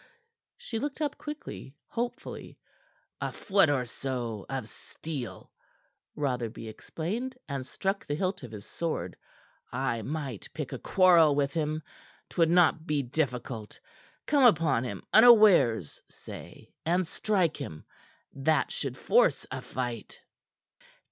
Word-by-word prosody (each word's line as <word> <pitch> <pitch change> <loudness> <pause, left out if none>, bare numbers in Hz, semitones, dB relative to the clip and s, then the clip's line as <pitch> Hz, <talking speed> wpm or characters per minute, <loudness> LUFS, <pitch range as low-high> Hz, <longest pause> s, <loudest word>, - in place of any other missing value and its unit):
she 225 - -4
looked 285 +4 -4
up 295 -2 -1
quickly, 295 - -7
hopefully. 240 +1 -5 0.6
"A - - -1
foot 195 -6 +3
or 135 -4 +1
so 120 -4 -4
of 130 -5 -3
steel," 140 0 -8 0.6
Rotherby 125 -6 -2
explained, 215 - -4
and 135 -3 -4
struck 195 +8 -2
the 145 - -1
hilt 185 +4 -1
of 125 - -8
his 105 -1 -9
sword. 165 -2 -3 0.6
"I 125 -3 -1
might 135 - -5
pick - - -4
a - - -5
quarrel 170 -6 +5
with 140 -1 +1
him. 155 -1 -1 0.5
'Twould 165 -2 +3
not 170 -1 +4
be 150 -2 +1
difficult. 125 -5 -3 0.5
Come 285 -3 +3
upon 155 - +4
him 100 -6 -5
unawares, 210 - +6
say, - - -11
and 175 +3 +2
strike 185 -2 0
him. 80 - -7 0.5
That 140 +2 +1
should - - -3
force - - +3
a - - -4
fight." 120 -3 -5
150 Hz, 125 wpm, -29 LUFS, 125-185 Hz, 0.6 s, unawares